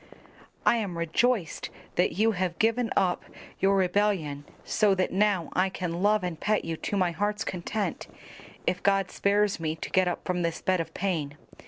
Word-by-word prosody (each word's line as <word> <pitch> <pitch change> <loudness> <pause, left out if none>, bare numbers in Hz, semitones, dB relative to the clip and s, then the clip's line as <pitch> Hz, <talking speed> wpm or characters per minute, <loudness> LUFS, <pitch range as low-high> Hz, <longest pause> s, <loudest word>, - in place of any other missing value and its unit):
"I 235 - +5
am 195 -6 -3
rejoiced 175 +3 0 0.2
that 180 - +2
you 220 +6 +3
have 180 -4 -2
given 230 +3 +2
up 185 -2 +2 0.4
your 195 +1 +3
rebellion 180 -6 +1 0.2
so 210 -2 +2
that 185 -1 0
now 195 -3 +2
I 185 +1 +2
can 180 -2 -4
love 210 0 +3
and 175 -3 -3
pet 215 0 +1
you 165 0 -2
to 205 - -2
my 180 -2 +2
heart's 205 +4 -1
content 185 +1 -3 0.6
if 180 +1 0
God 195 -2 +2
spares 205 -1 +1
me 160 -1 -2
to - - -7
get 185 -1 +3
up 175 - -3
from 180 -1 -1
this 170 0 -1
bed 185 -1 +1
of 165 0 -7
pain. 155 -7 -2
185 Hz, 180 wpm, -27 LUFS, 170-205 Hz, 0.6 s, I